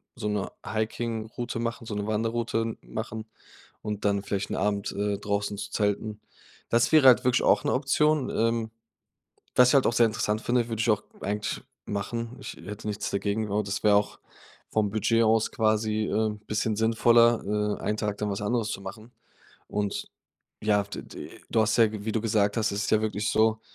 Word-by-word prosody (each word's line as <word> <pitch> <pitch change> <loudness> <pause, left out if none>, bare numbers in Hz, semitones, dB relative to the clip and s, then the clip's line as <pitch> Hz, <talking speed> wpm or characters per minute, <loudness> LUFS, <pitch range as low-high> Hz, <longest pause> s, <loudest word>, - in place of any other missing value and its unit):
so - - -4
'ne 105 -2 -1 0.2
Hiking-Route 115 +1 -3
machen 115 0 -3
so 110 - -5
'ne 105 0 -3
Wanderroute 115 +1 -1
machen 110 - -6 0.6
und 105 -1 -4
dann 100 -1 +2
vielleicht 100 -1 -2
'n - - -1
Abend, 100 -1 0
äh, 100 0 -1
draußen 100 0 -2
zu 100 0 -5
zelten. 105 +1 -1 0.5
Das 115 0 +3
wäre 155 -4 +7
halt 125 -1 +7
wirklich 125 -1 +3
auch - - +4
'ne - - +2
Option, 150 +1 +2
ähm, 115 0 0 0.9
was 125 0 +7
ich 130 - +3
halt 135 - +5
auch - - +3
sehr 115 -1 +5
interessant 110 -1 -1
finde, 120 -1 +1
würde 110 -2 -3
ich 115 +1 +2
auch 105 -1 +1 0.2
eigentlich 105 +1 -2 0.2
machen. 115 +4 -4
Ich - - -7
hätte 100 +4 -8
nichts 105 -1 -3
dagegen, 100 +2 -1
genau, 105 0 0
das 100 0 -3
wäre 105 -1 +6
auch 105 0 0 0.5
vom 105 -2 +1
Budget 115 +2 +2
aus 110 0 +3
quasi, 110 -1 +1
äh, 110 0 +1 0.2
bisschen 105 +1 0
sinnvoller, 110 -2 +3
äh, - - -9
einen 105 - 0
Tag 105 -1 -2
dann 105 -1 -1
was 100 - -3
anderes 115 +1 0
zu - - -4
machen. 110 +5 -9 0.6
Und, 105 -1 -2 0.5
ja, 105 -1 +2
d 100 - -7
d - - -9 0.2
du 115 - +3
hast 110 0 +2
ja, 115 -2 +6
wie 110 0 -4
du 110 - 0
gesagt 105 -2 +1
hast 110 - +1
es 100 +1 -1
ist - - -2
ja 110 - +5
wirklich 105 -1 -1
so, 110 0 +3
110 Hz, 190 wpm, -27 LUFS, 105-115 Hz, 0.9 s, wäre